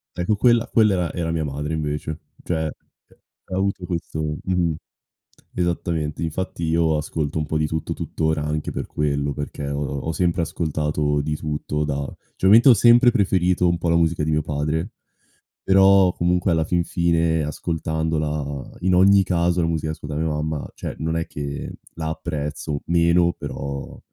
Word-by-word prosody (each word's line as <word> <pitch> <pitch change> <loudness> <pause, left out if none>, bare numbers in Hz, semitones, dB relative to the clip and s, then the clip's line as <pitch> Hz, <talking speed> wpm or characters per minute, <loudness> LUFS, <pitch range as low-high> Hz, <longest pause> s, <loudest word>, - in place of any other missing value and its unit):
Ecco 90 +5 0
quella 120 +2 +3
quella 110 -3 +4
era 90 -2 0
era 85 -2 -2
mia 80 -2 -1
madre 75 +3 -4
invece. 75 0 -3 0.2
Cioè, 80 -2 -1
ha 85 +4 -11
avuto 95 -1 -1
questo 80 -3 -3
mh-mh. 90 -3 +1 0.8
Esattamente, 85 -3 -1
infatti 85 +2 -3
io 80 -1 +2
ascolto 75 0 -2
un 75 - -1
po' 80 - -1
di 75 - +1
tutto 80 +1 -3
tuttora 80 -1 -1
anche 75 0 -2
per - - -4
quello, 70 -1 -1
perché 75 0 -5
ho 70 +1 -2 0.2
ho 80 - -3
sempre 85 0 +1
ascoltato 75 -2 -1
di 75 +1 -2
tutto 75 0 -3
da 70 -1 -2 0.3
cioè - - -3
ovviamente 115 +6 +7
ho 130 - +10
sempre 120 +2 +6
preferito 90 -5 +2
un 85 0 +1
po' 85 - -1
la 85 - +3
musica 85 -2 +2
di 75 - -1
mio 75 -1 +1
padre; 75 +6 -2 0.7
però 95 -1 +5
comunque, 90 +1 +1
alla 80 -1 +2
fin 85 0 +1
fine, 85 -2 +1
ascoltandola, 75 -2 -3
in 90 0 +2
ogni 95 +2 +6
caso, 90 -1 +1
la 80 - +1
musica 80 -1 -1
che 80 - -7
ascolta 75 0 -6
mia 80 +1 0
mamma, 75 0 -3
cioè - - -5
non 80 +1 -1
è 85 - -1
che 70 -1 -5 0.2
la 80 -1 -3
apprezzo 75 -2 -4
meno, 85 0 +3
però 70 0 -6
80 Hz, 170 wpm, -22 LUFS, 75-90 Hz, 0.8 s, ho